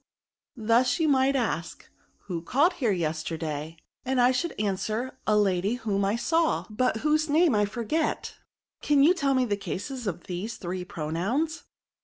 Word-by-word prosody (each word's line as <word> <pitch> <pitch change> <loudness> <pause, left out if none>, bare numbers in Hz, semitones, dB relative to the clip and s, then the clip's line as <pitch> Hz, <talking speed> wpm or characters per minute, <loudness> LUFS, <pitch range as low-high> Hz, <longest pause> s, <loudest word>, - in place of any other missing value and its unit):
Thus 235 +4 +2
you 320 - +2
might 275 -1 +3
ask, 220 -10 -2 0.3
who 175 -4 -5
called 285 - +2
here, 255 -9 -1
yesterday? 160 -2 -3 0.3
and 260 0 0
I 245 +1 +5
should 295 +4 -2
answer, 215 +5 -2
a 215 -1 +4
lady 200 +1 +2
whom 210 -5 -1
I 200 +2 +1
saw, 325 +7 +1
but 225 0 0
whose 305 +1 +2
name 315 0 +4
I 210 -1 +3
forget: 235 +9 -2 0.5
can 285 -2 +4
you 330 +5 +6
tell 280 -6 +1
me 255 -1 +3
the 205 -4 0
cases 235 +5 -5
of 175 -3 -3
these 190 +5 -5
three 180 0 -4
pro 160 -5 -5
nouns?" 260 - -1
230 Hz, 165 wpm, -27 LUFS, 190-275 Hz, 0.5 s, you